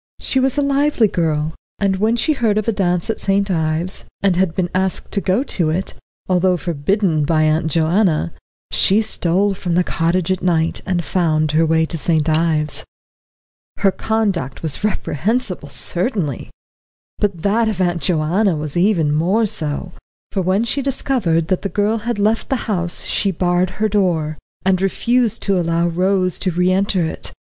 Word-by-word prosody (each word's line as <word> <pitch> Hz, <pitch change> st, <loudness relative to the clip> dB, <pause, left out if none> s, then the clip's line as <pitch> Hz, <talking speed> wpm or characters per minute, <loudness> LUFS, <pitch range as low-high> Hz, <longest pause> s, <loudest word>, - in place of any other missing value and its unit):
She 265 Hz, -, +1 dB
was 265 Hz, +1 st, +1 dB
a 290 Hz, -, +2 dB
lively 280 Hz, -4 st, +2 dB
girl, 160 Hz, -4 st, -1 dB, 0.2 s
and 195 Hz, -1 st, 0 dB
when 220 Hz, +4 st, +2 dB
she 310 Hz, +7 st, +1 dB
heard 225 Hz, -6 st, +1 dB
of 215 Hz, -, -1 dB
a -, -, +3 dB
dance 180 Hz, -4 st, 0 dB
at -, -, -6 dB
St. 195 Hz, 0 st, +1 dB
Ives, 160 Hz, +2 st, -1 dB, 0.2 s
and 195 Hz, -3 st, +3 dB
had 180 Hz, -2 st, +1 dB
been 180 Hz, -2 st, -1 dB
asked 190 Hz, 0 st, 0 dB
to 200 Hz, -, -1 dB
go 195 Hz, +8 st, +1 dB
to 175 Hz, -, 0 dB
it, 180 Hz, +5 st, -2 dB, 0.3 s
although 185 Hz, 0 st, +2 dB
forbidden 170 Hz, +1 st, 0 dB
by 155 Hz, +1 st, +2 dB
Aunt 155 Hz, +2 st, +1 dB
Joanna, 165 Hz, -, +1 dB, 0.4 s
she 210 Hz, +3 st, +4 dB
stole 195 Hz, -1 st, +1 dB
from 180 Hz, -2 st, -3 dB
the 180 Hz, -, +3 dB
cottage 170 Hz, +2 st, 0 dB
at 185 Hz, -, -1 dB
night, 165 Hz, -2 st, 0 dB
and 175 Hz, -2 st, 0 dB
found 155 Hz, -2 st, +1 dB
her 160 Hz, +1 st, +2 dB
way 160 Hz, 0 st, +2 dB
to 165 Hz, 0 st, -5 dB
St. 155 Hz, -1 st, +1 dB
Ives. 155 Hz, -1 st, +1 dB, 0.9 s
Her 195 Hz, -1 st, +3 dB
conduct 195 Hz, -, -2 dB
was 160 Hz, +4 st, +1 dB
reprehensible 200 Hz, -, -1 dB
certainly. 165 Hz, -, -2 dB, 0.7 s
But 195 Hz, -6 st, -1 dB
that 220 Hz, +3 st, +2 dB
of 205 Hz, -4 st, -4 dB
Aunt 175 Hz, -2 st, 0 dB
Joanna 175 Hz, +3 st, +1 dB
was 150 Hz, -1 st, -5 dB
even 175 Hz, -5 st, +2 dB
more 185 Hz, +9 st, +2 dB
so, 160 Hz, -2 st, -3 dB, 0.4 s
for 195 Hz, -, -1 dB
when 185 Hz, +4 st, +1 dB
she 275 Hz, +4 st, -1 dB
discovered 245 Hz, -, 0 dB
that 185 Hz, -, +1 dB
the 200 Hz, -, -3 dB
girl 210 Hz, +4 st, 0 dB
had 235 Hz, +1 st, -3 dB
left 215 Hz, +2 st, 0 dB
the 270 Hz, -, +1 dB
house 175 Hz, -5 st, 0 dB
she 200 Hz, -, +1 dB
barred 180 Hz, 0 st, +1 dB
her 215 Hz, -, +1 dB
door, 175 Hz, -7 st, 0 dB, 0.3 s
and 190 Hz, -1 st, +2 dB
refused 230 Hz, +3 st, +1 dB
to 195 Hz, -2 st, +1 dB
allow 170 Hz, 0 st, +1 dB
Rose 185 Hz, +1 st, +1 dB
to 185 Hz, -, 0 dB
re 180 Hz, +1 st, +1 dB
enter 190 Hz, -2 st, +1 dB
it. 160 Hz, -, -4 dB
185 Hz, 175 wpm, -19 LUFS, 165-205 Hz, 0.9 s, she